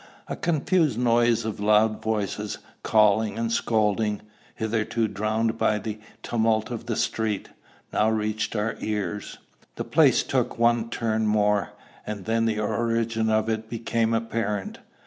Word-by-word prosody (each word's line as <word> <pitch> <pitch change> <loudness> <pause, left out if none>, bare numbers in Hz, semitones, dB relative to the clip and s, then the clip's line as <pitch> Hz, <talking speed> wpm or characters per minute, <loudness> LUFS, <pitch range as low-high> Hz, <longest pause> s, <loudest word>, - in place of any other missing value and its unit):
A - - -3
confused 160 - +1
noise 120 -1 +3
of 110 -2 -4
loud 105 +1 +3
voices, 105 -3 -2 0.2
calling 110 0 +3
and 115 0 -1
scolding, 110 -2 +1 0.3
hitherto 110 +1 0
drowned 110 +3 -1
by 105 - +2
the 110 0 -5 0.2
tumult 110 0 +1
of 115 -1 -6
the 115 - -1
street, 110 -2 -1 0.4
now 110 - +3
reached 110 0 -1
our 105 +1 -1
ears. 105 -1 -3 0.4
The - - -3
place - - +4
took - - -1
one 120 0 +2
turn 110 -2 0
more, 105 -1 +2 0.3
and 105 -3 -5
then 115 0 +1
the 110 -2 0
origin 115 +1 0
of 110 0 +2
it 110 0 -2
became 115 0 0
apparent. 115 -3 -2
110 Hz, 140 wpm, -25 LUFS, 105-115 Hz, 0.4 s, place